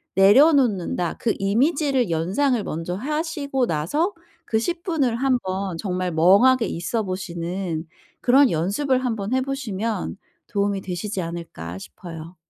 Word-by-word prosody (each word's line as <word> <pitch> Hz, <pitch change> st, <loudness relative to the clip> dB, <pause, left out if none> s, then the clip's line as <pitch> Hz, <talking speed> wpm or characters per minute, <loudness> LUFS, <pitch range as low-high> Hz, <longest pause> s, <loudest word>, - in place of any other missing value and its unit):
내려놓는다." 205 Hz, -, +4 dB
그 230 Hz, -, +1 dB
이미지를 265 Hz, -, +2 dB
연상을 210 Hz, -, +1 dB
먼저 165 Hz, +1 st, -4 dB
하시고 285 Hz, -, -1 dB
나서 290 Hz, -, 0 dB, 0.3 s
그 220 Hz, -, +1 dB
10 340 Hz, +8 st, -3 dB
분을 285 Hz, -10 st, +1 dB
한번 200 Hz, -8 st, -1 dB
정말 185 Hz, -2 st, -2 dB
멍하게 200 Hz, +10 st, +5 dB
있어보시는 180 Hz, -3 st, -3 dB, 0.4 s
그런 265 Hz, +1 st, +5 dB
연습을 255 Hz, -, 0 dB
한번 225 Hz, -3 st, -2 dB
해 260 Hz, -, +2 dB
보시면 230 Hz, -8 st, -3 dB, 0.3 s
'도움이 200 Hz, -1 st, -1 dB
되시지 190 Hz, +2 st, -4 dB
않을까?' 165 Hz, -, -6 dB
싶어요. 165 Hz, -, -10 dB
205 Hz, 280 characters per minute, -23 LUFS, 180-265 Hz, 0.4 s, 멍하게